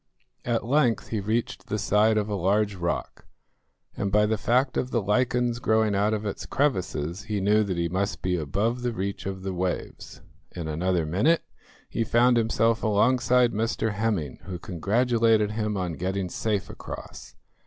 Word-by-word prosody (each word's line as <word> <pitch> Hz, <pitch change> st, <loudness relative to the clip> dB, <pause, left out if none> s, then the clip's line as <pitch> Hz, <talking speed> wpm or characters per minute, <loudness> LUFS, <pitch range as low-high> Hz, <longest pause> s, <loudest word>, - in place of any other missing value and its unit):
At 115 Hz, -2 st, 0 dB
length 125 Hz, -2 st, +2 dB
he 110 Hz, -, -1 dB
reached 110 Hz, +4 st, -2 dB
the 105 Hz, -, -1 dB
side 110 Hz, +1 st, +3 dB
of 105 Hz, -1 st, 0 dB
a 105 Hz, -, -3 dB
large 100 Hz, +2 st, +1 dB
rock, 85 Hz, -2 st, -4 dB, 0.7 s
and 100 Hz, -, -2 dB
by 105 Hz, +1 st, +4 dB
the 110 Hz, +1 st, +1 dB
fact 125 Hz, +4 st, +1 dB
of 125 Hz, -, -1 dB
the 120 Hz, -, +1 dB
lichens 120 Hz, +3 st, +1 dB
growing 110 Hz, -3 st, +2 dB
out 100 Hz, +2 st, +2 dB
of 110 Hz, 0 st, -2 dB
its 100 Hz, -, -4 dB
crevices 95 Hz, -, -1 dB
he 105 Hz, -2 st, -2 dB
knew 105 Hz, +3 st, +3 dB
that 95 Hz, -4 st, -3 dB
he 85 Hz, 0 st, 0 dB
must 95 Hz, +4 st, -2 dB
be 90 Hz, -1 st, +1 dB
above 100 Hz, -, -1 dB
the 120 Hz, -1 st, -1 dB
reach 100 Hz, 0 st, -4 dB
of 95 Hz, -1 st, -5 dB
the 95 Hz, -1 st, -3 dB
waves. 90 Hz, 0 st, -4 dB, 0.3 s
In 85 Hz, -3 st, -4 dB
another 85 Hz, +2 st, 0 dB
minute 115 Hz, -, +2 dB, 0.4 s
he 115 Hz, -, -1 dB
found 120 Hz, +2 st, +4 dB
himself 115 Hz, 0 st, +2 dB
alongside 120 Hz, +3 st, +3 dB
Mr 110 Hz, 0 st, -1 dB
Hemming, 105 Hz, -, -2 dB
who 95 Hz, -2 st, -5 dB
congratulated 110 Hz, +4 st, +1 dB
him 105 Hz, -1 st, -2 dB
on 90 Hz, -3 st, -2 dB
getting 95 Hz, +2 st, -2 dB
safe 105 Hz, 0 st, -1 dB
across. 65 Hz, +2 st, -9 dB
105 Hz, 170 wpm, -26 LUFS, 95-115 Hz, 0.7 s, by